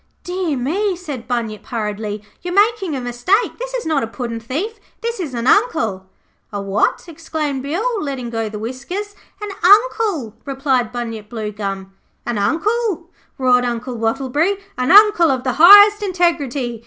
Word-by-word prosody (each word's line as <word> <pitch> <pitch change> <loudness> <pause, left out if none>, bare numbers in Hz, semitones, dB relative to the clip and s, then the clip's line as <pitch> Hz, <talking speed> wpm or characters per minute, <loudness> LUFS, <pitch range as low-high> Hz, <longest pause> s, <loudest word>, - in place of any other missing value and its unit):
'Dear 355 -5 -2
me,' 365 +10 -1
said 295 -9 -7
Bunyip, 230 -4 -3
hurriedly, 210 -3 -4 0.2
'you 355 - -5
are - - -3
making 405 -5 +2
a - - -3
mistake. 245 - 0
This - - -5
is - - -3
not 310 -3 +1
a 225 - -2
puddin' 230 0 -5
thief, 330 - -4 0.2
this 470 -1 -3
is 300 -8 -4
an 235 0 -3
Uncle.' 230 - +1 0.4
'A 205 - -4
what?' 200 +1 0
exclaimed 310 -4 -4
Bill, 405 - -2
letting 265 -5 -4
go 225 -1 -2
the 210 - -7
whiskers. 275 - -5 0.3
'An 420 -1 -5
Uncle,' 410 - +3
replied 265 -4 -1
Bunyip 225 -3 -6
Bluegum. 200 -4 -5 0.3
'An 235 -3 -2
Uncle,' 350 - -1 0.3
roared 250 -2 +3
Uncle 245 +1 -3
Wattleberry. 270 - 0 0.2
'An 250 0 -1
Uncle 410 -4 +7
of 260 -2 0
the 255 -1 0
highest 410 +3 +9
integrity. 295 - -1
275 Hz, 155 wpm, -19 LUFS, 235-380 Hz, 0.4 s, highest